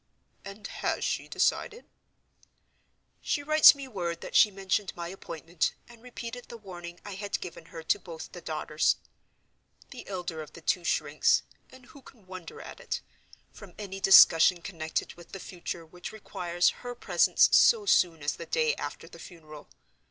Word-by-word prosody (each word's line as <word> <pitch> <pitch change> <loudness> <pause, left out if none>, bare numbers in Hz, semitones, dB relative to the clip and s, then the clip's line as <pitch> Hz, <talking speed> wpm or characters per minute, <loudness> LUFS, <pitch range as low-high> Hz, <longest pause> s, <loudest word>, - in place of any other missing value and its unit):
"And 200 +1 -10
has - - -2
she - - -2
decided?" 470 +1 -1 1.4
"She 285 - -1
writes 310 0 +8
me 275 -1 -8
word 175 -7 -4
that - - -8
she 215 - +7
mentioned 195 0 -2
my 170 0 -5
appointment, 165 -2 -3
and 235 -1 -16
repeated 245 0 -8
the 235 - -8
warning 175 -4 -10
I 205 - -6
had 200 +1 -4
given 170 -2 -9
her 165 0 -10
to 205 - +1
both 165 -4 -9
the 175 - -10
daughters. 155 -1 0 1.0
The 250 - -10
elder 175 -4 -5
of 155 - -11
the 170 - -12
two 175 +2 0
shrinks—and 155 - -1
who 280 +2 -16
can 230 -6 -18
wonder 185 - -10
at - - -10
it?—from - - -10
any 195 -2 -7
discussion 175 -2 +7
connected 160 -4 -4
with 175 -1 -16
the 195 - -6
future 175 -2 -7
which 175 +2 -9
requires 175 -5 0
her 245 0 -6
presence - - +3
so 450 -3 +5
soon 170 - +3
as 145 - -1
the - - -8
day 470 -1 +1
after - - -6
the - - -14
funeral. 155 -4 -12
185 Hz, 160 wpm, -28 LUFS, 170-225 Hz, 1.4 s, writes